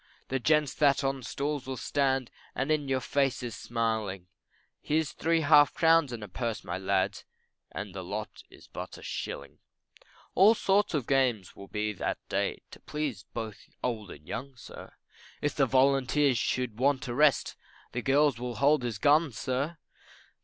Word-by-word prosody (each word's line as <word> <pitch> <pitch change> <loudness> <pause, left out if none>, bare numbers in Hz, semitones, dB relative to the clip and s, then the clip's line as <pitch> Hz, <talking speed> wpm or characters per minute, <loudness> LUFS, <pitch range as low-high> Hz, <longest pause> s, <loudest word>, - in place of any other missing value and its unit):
The 135 - 0
gents 150 +1 +2
that 140 -1 +3
on 135 0 0
the 130 - -12
stools 140 +1 -3
will 130 -1 -4
stand, 135 -1 0 0.2
And 135 +4 -1
in 150 -2 +1
your 130 -1 0
faces 130 -3 0
smiling, 110 -4 -2 0.6
Hear's 155 0 0
three 165 0 +1
half 145 -2 +6
crowns 165 -4 +4
and 115 -3 -6
a - - -6
purse, 115 +3 -3
my 90 +2 -4
lads, 95 +1 0 0.5
And 100 -2 -6
the 95 -1 -6
lot 105 +4 -5
is - - -16
but - - -7
a - - -13
shilling. - - -6 0.7
All 205 +5 +6
sorts 200 -3 +2
of 140 -5 -1
games 125 -8 +1
will 100 - -11
be 105 +1 -2
that 100 - -2
day, - - -1
To - - -12
please 145 -10 -4
both 110 -3 -5 0.2
old 110 -5 -2
and 75 -2 -12
young, 135 +2 -5
sir; 120 - -11 0.5
If 145 - -1
the 135 -2 +2
volunteers 135 0 +3
should 125 -3 -1
want 135 0 +2
a 120 - -3
rest, 145 +2 +3 0.4
The 120 - -3
girls 140 -1 +3
will 125 -1 -4
hold 145 +4 +3
his 120 -4 -3
gun, 150 +5 +4
sir. 130 +9 -2
130 Hz, 170 wpm, -29 LUFS, 110-145 Hz, 0.7 s, half